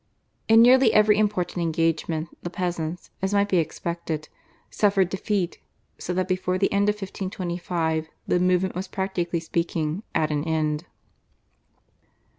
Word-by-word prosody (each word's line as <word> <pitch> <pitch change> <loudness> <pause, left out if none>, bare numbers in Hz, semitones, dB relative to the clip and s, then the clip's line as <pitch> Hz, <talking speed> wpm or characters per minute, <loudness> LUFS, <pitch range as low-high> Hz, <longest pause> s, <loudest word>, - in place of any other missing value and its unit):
In 225 +1 +7
nearly 255 -1 +6
every 210 0 +5
important 195 -4 0
engagement 165 0 0
the 175 - -4
peasants, 175 -2 -4
as 190 +2 0
might 200 0 +3
be 185 - +3
expected, 165 -1 -3 0.4
suffered 195 -3 +2
defeat, 190 -1 -2 0.4
so - - -4
that 185 0 0
before 185 0 0
the 195 - +1
end 200 +1 +3
of 210 - +1
1525 175 -5 -3 0.2
the 180 - +2
movement 180 +1 +2
was, 185 +2 -4
practically 180 -3 -2
speaking, 165 +1 -2
at 155 -1 +1
an 145 -1 0
end. 155 0 -1
180 Hz, 135 wpm, -25 LUFS, 165-195 Hz, 0.4 s, In